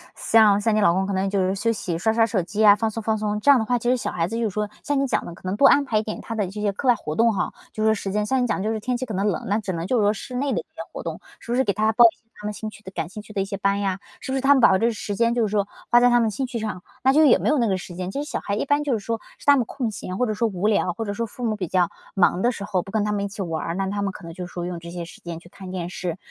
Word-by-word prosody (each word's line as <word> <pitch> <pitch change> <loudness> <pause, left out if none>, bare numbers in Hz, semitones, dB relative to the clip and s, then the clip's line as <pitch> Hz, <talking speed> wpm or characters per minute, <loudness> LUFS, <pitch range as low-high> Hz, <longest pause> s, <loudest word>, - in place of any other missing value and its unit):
像 215 -3 +4
像 225 +1 +2
你 - - +3
老 185 -4 +5
公 190 +2 +1
可 200 - -2
能 190 +1 0
就 200 0 0
是 185 +1 +1
休 230 +3 +1
息， 180 -6 -3
刷 220 +6 +1
刷 225 0 +4
手 215 -4 0
机 195 +5 -6
呀， 205 -2 +8
放 220 +1 -1
松 225 +1 -5
放 220 0 0
松。 210 0 -1
这 285 - +2
样 280 -3 +8
的 220 - -1
话， 245 +2 +1
其 240 +1 -1
实 255 - +4
小 - - -3
孩 165 -1 -1
子 225 - -5
就 235 - -1
是 220 - +1
说 210 +1 -2
像 290 -1 0
你 275 - +2
讲 - - 0
的 175 - -7
可 - - -16
能 185 +2 -1
多 275 - +6
安 285 - +5
排 225 -5 0
一 - - -2
点 215 - -5
他 225 - -6
的 210 -2 0
这 205 +3 -6
些 205 -1 +1
课 230 +7 -4
外 245 - +6
活 155 -8 -5
动 230 0 +4
哈- 195 - -1 0.2
就 215 - -2
说 220 0 +4
时 200 -2 -4
间。 210 +1 0
像 260 +4 +1
你 - - +1
讲 225 - 0
的 - - -2
就 215 - 0
是 220 - -2
天 250 +4 -2
气 255 - -4
可 225 - -6
能 195 +1 0
冷， 195 - -1
那 205 +2 +1
只 205 -3 -4
能 170 +1 -3
就 250 - +1
是 215 - +3
说 205 +1 +3
室 250 +4 -8
内 275 +2 0
的 - - 0
一 - - -6
些 - - -11
活 - - -6
动， - - -5 0.2
是 235 - -8
不 - - +2
是 260 - +3
给 200 - 0
他 215 +3 +2
报 240 +2 +7
一 230 - +5
些 - - -36 0.2
他 - - -8
们 210 - -2
兴 215 +1 -5
趣 210 - -15
的 190 - -9
感 170 -3 -4
兴 210 +3 -8
趣 215 - -13
的 195 - 0
一 - - -1
些 200 0 -5
班 200 0 +1
呀， 195 -1 -1 0.2
是 - - -5
不 - - 0
是 - - -1
他 275 +2 +6
们 270 - +3
把 190 - +6
这 230 +5 +2
时 205 -2 -5
间， 235 +2 +2
就 240 - +1
是 205 - -3
说 205 -2 +1 0.2
花 240 - +7
在 245 0 +5
他 240 0 +4
们 225 - +2
兴 265 +6 -2
趣 245 -1 -4
上， 210 -5 -4 0.2
那 265 - +5
就 310 +3 +5
也 270 - +6
没 - - 0
有 300 - +3
那 235 -3 +2
个 190 -2 +1
时 175 - -9
间。 180 0 -4
其 280 - -3
实 300 - -9
小 - - -2
孩 200 - -2
一 - - -1
般 285 +1 +2
就 285 -3 0
是 225 - 0
说 225 +3 -3 0.2
是 - - -16
他 285 0 +7
们 245 - +1
空 245 0 -3
闲 185 -2 -6
或 250 - +2
者 215 - -1
说 230 +2 +1
无 195 -2 -3
聊， 200 -4 +2
或 225 - -4
者 205 - -3
说 230 +3 -2
父 245 +3 -9
母 220 -2 0
比 185 -3 -3
较 180 0 +2 0.2
忙 185 -1 +3
的 240 - +3
时 205 -4 -7
候， 190 -3 0
不 195 - -11
跟 215 -2 +2
他 210 - -1
们 205 -1 -1
一 - - -2
起 200 0 -7
玩 165 -3 -2
儿， 165 - -3
那 195 +1 -1
他 205 +1 -2
们 200 -1 -1
可 200 - -11
能 165 - -8
就 180 +1 -6
是 - - -16
说 175 -1 -4
用 175 -1 -4
这 170 0 -10
些 175 -1 -5
时 - - -13
间 170 -1 -6
去 175 - -17
看 190 0 -10
电 175 -2 -4
视， 180 -2 -4
210 Hz, 420 characters per minute, -23 LUFS, 190-230 Hz, 0.2 s, 呀